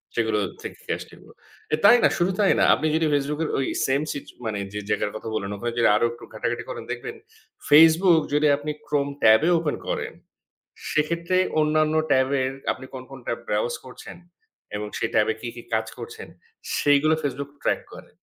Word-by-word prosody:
সেগুলো 110 -2 +1 0.2
থেকে - - -10
আসছিলো। - - -13 0.4
এ - - +6
তাই 205 +4 +9
না, - - +6
শুধু 175 +2 +1
তাই 205 - +4
না, - - +4
আপনি 155 - -1
যদি 160 0 +2
Facebook 145 +2 -1
এর - - -2
ওই 135 - 0 0.2
সেইম 135 +2 +1
সিচ 140 - -7 0.2
মানে, 105 -2 -2
যে 105 - -3
জায়গার 105 - 0
কথা 110 - -6
বললেন, 100 -2 -3
ওখানে 120 +4 -3
যদি 115 - +4
আরো 105 - +2
একটু 120 0 -12
ঘাটাঘাটি - - -3
করেন - - -6
দেখবেন, 440 +1 -5 0.5
Facebook 160 +3 +7
যদি 150 +1 +3
আপনি 150 +1 -4
Chrome 140 -1 0
ট্যাবে 110 +8 +6
ওপেন 150 -3 -1
করেন, - - -3 0.8
সেক্ষেত্রে 170 +4 0 0.2
অন্যান্য 155 0 +2 0.2
ট্যাবের 130 0 +2 0.2
আপনি 130 - -11
কোন, 130 - -6
কোন 135 - -9
tab 115 - -2
browse 105 +3 0
করছেন 130 - -11 0.6
এবং 105 0 -4
সেই 115 - -1
ট্যাবে 110 +1 +3
কি, 120 - -5
কি 120 - -8
কাজ 110 0 0
করছেন, - - -8 0.5
সেইগুলো 145 +2 +3
Facebook 140 0 -3
ট্র্যাক - - 0
করে। - - -12
140 Hz, 180 wpm, -24 LUFS, 120-155 Hz, 0.8 s, তাই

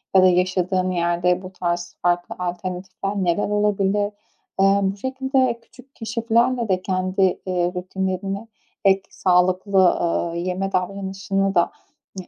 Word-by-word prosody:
ya 185 - +7
da - - +7
yaşadığın 185 0 +1
yerde 175 +1 +1
bu 185 -1 -9
tarz 175 -1 -3
farklı 175 0 0
alternatifler 185 +2 -4
neler 190 +1 0
olabilir? 205 0 +1 0.5
Eee, 195 +1 +5
bu 195 +1 0
şekilde 260 0 0
küçük 255 +4 -19
keşiflerle 230 +1 +1
de 185 -1 +1
kendi, 185 0 +1
ııı, 180 0 0
rutinlerini 190 +3 -3 0.4
ek 195 0 +5
sağlıklı, 185 +2 +2 0.2
ııı, 170 0 0
yeme 185 +2 -2
davranışını 195 +1 -1
da, 170 - +3 0.5
hani, 185 - -7
190 Hz, 125 wpm, -22 LUFS, 180-200 Hz, 0.5 s, ya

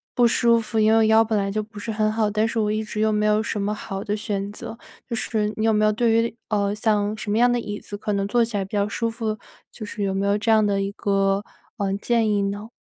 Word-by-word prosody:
不 245 -1 +5
舒 235 0 +3
服， 225 0 -2
因 215 0 +4
为 225 - +5
我 - - +4
腰 220 +1 +5
本 220 -1 -1
来 195 -1 -1
就 215 +2 -1
不 215 +1 -13
是 215 +2 -4
很 215 0 +1
好， 215 -1 +1
但 215 +2 +1
是 230 - -4
我 210 -1 +1
一 215 +1 -1
直 215 0 -6
又 215 0 +2
没 210 0 +1
有 210 +1 +3
什 215 -2 -3
么 205 +1 -1
好 195 -2 -6
的 210 -1 -1
选 205 -1 -3
择， 210 - -8 0.3
就 235 - -3
是 215 -2 -1
你 215 - 0
有 225 - +3
没 215 0 +3
有 215 - +4
对 230 +2 +1
于， 230 0 +1
呃， 205 -1 +1
像 210 -1 0
什 215 - -7
么 210 - +1
样 245 +1 +4
的 245 - +1
椅 205 -2 -5
子 205 - -8
可 210 0 -3
能 200 0 0
坐 240 +3 +3
起 225 -2 -3
来 195 - -1
比 195 - -17
较 205 -1 +1
舒 230 +2 -2
服， 225 -1 -3 0.3
就 215 - -8
是 210 0 -7
有 195 -1 0
没 195 +1 -1
有 200 +1 +2
这 220 +2 -2
样 220 -1 +5
的 200 -1 +1
一 195 - -2
个， 195 0 +1 0.3
呃， 200 -3 -1
建 230 -2 +2
议 205 -1 +1
呢？ 205 +2 -4
215 Hz, 315 characters per minute, -23 LUFS, 205-225 Hz, 0.3 s, 不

